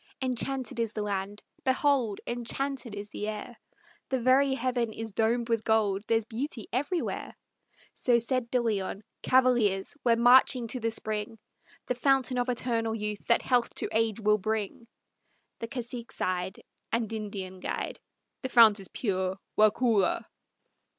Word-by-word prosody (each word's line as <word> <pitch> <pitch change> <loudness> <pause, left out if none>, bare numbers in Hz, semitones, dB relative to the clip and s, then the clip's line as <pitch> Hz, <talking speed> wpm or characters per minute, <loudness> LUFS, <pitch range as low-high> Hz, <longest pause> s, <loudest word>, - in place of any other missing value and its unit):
Enchanted 255 -1 -2
is 230 -2 -1
the 210 - -2
land; 205 0 -3 0.2
behold! 260 -5 +2
enchanted 245 0 -3
is 205 0 -7
the 210 - -5
air; 215 +2 -6 0.5
The 265 - +1
very 265 +2 +4
heaven 245 -3 -1
is 225 0 -6
domed 230 +3 +1
with 230 -2 0
gold; 210 -3 +2
there's 225 -1 +2
beauty 235 0 -4
everywhere!" 290 +8 -2 0.6
So 245 -2 +3
said 240 0 +1
De 250 - +2
Leon. 210 -3 -2 0.2
"Cavaliers, 240 -7 +3
We're 235 -2 +4
marching 245 +1 +5
to 255 - -1
the 230 -1 0
spring, 215 0 -4 0.5
The - - 0
fountain 255 0 +2
of 245 +1 0
eternal 230 -2 -1
youth 210 -1 -4
that 235 - +4
health 245 -2 +1
to - - -2
age 225 -1 +1
will 210 -1 +3
bring!" 220 +3 -3 0.7
The 230 - -4
cacique 240 -1 -6
sighed, 185 +1 -3 0.3
And 230 -1 -1
Indian 200 -4 -5
guide, - - -4 0.4
"The 260 - -3
fount 225 -4 +7
is 195 - -7
pure, 190 -4 -2 0.2
Waukulla!" 215 -2 +3
230 Hz, 145 wpm, -29 LUFS, 210-250 Hz, 0.7 s, fount